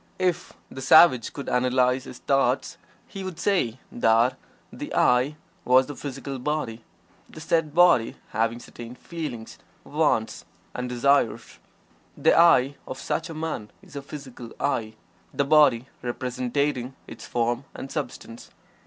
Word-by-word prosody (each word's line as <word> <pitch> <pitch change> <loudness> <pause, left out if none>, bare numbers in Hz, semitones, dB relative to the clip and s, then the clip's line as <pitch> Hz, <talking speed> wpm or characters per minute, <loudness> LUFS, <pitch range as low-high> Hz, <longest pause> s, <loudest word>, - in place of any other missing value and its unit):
If 180 -2 -1 0.2
the 130 - -8
savage 130 -3 +6
could 140 - -8
analyze 125 +1 +1
his 125 - -9
thoughts 135 -1 0 0.3
he 195 - -7
would 185 -3 -6
say 165 - 0
that 120 +2 +3 0.4
the - - -7
"I" 125 +4 +3 0.3
was 130 +1 +5
the 145 - -8
physical 135 -1 -6
body, 125 -5 -3 0.5
the - - -11
said 160 -1 0
body 175 -10 +5
having 115 +2 0
certain 120 0 -10
"feelings," 140 -8 -7 0.2
"wants" - - 0 0.3
and 125 0 -4
"desires." 125 0 +1 0.6
The 155 +3 +4
"I" 145 -5 +5
of 130 - -6
such 165 +4 -3
a 165 - -7
man 155 -9 -4
is - - -16
a 140 - -4
physical 135 -5 -10
"I," 110 -6 -1 0.4
the 140 - +1
body 140 -5 +5 0.2
representing 125 +2 -2
its - - -10
form 120 +2 -1
and 135 - -7
substance. 125 -5 -6
130 Hz, 135 wpm, -25 LUFS, 120-150 Hz, 0.6 s, savage